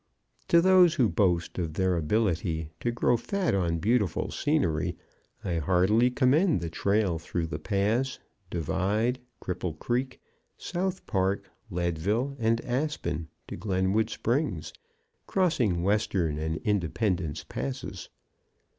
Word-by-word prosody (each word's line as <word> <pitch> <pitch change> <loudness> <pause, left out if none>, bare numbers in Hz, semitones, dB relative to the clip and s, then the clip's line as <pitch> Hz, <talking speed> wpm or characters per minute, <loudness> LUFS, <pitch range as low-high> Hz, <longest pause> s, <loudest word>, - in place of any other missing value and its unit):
To 170 - +6
those 180 -2 +6
who 130 -7 +4
boast 90 -5 +1
of 80 -3 -3
their 95 0 +2
ability 85 -3 0
to 120 - -1
grow 120 +1 +2
fat 190 - -1
on 85 -4 +1
beautiful 105 +3 +1
scenery 85 - 0 0.5
I 85 -3 -1
heartily 95 +9 +3
commend 130 - +3
the 85 -1 -4
trail 100 -3 +1
through 80 0 -3
Ute 75 0 -5
Pass, 110 +6 +1 0.3
Divide, 100 - 0 0.2
Cripple 90 -3 -3
Creek, 125 +6 -2 0.4
South 185 +1 -3
Park, 95 -1 -1 0.2
Leadville 90 - -1
and 115 0 +2
Aspen 120 - -2 0.2
to - - -6
Glenwood 95 +2 +1
Springs, 115 - -1 0.5
crossing 125 - +1
Western 95 -6 +1
and 80 +1 -2
Independence 95 -4 0
Passes. 65 +2 -5
100 Hz, 120 wpm, -28 LUFS, 85-125 Hz, 0.5 s, To